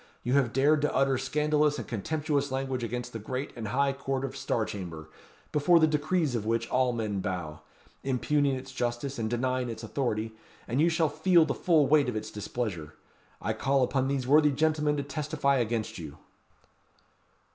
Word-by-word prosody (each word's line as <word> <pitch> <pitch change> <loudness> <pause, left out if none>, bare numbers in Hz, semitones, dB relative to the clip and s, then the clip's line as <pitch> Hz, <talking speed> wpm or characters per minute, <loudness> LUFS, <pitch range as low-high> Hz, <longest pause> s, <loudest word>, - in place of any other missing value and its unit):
You 125 - 0
have 135 -4 +3
dared 145 +4 +3
to 150 - 0
utter 135 -1 +2
scandalous 150 +2 +1
and - - -6
contemptuous 145 +5 -1
language 130 -2 -2
against 120 +2 -4
the 115 - -4
great 130 +6 -4
and 115 -3 -5
high 135 +5 +1
court 135 -1 -2
of 135 - -6
Star 110 - -1
Chamber, 85 -7 -7 0.4
before 165 +4 +4
the 160 - +6
decrees 155 0 +1
of 115 -4 -1
which, 115 +1 0
all 130 0 +2
men 110 -4 -2
bow; 90 -6 -4 0.4
impugning 140 +1 +1
its 130 +1 -7
justice 120 +1 -3
and 110 -1 -1
denying 130 +1 -1
its 115 0 -6
authority; 110 -2 -2 0.4
and 125 +5 +1
you 170 - +5
shall 165 -1 +2
feel 170 +3 +4
the 145 - -1
full 160 -5 +3
weight 145 -2 +4
of 120 - -4
its 110 - -4
displeasure. 100 -7 -4 0.4
I - - -1
call 135 0 +1
upon 130 +1 +1
these 135 -2 -1
worthy 150 +3 +5
gentlemen 150 +1 +1
to 140 - -1
testify 140 0 0
against 115 -4 -2
you." 75 -4 -8
135 Hz, 180 wpm, -28 LUFS, 115-145 Hz, 0.4 s, the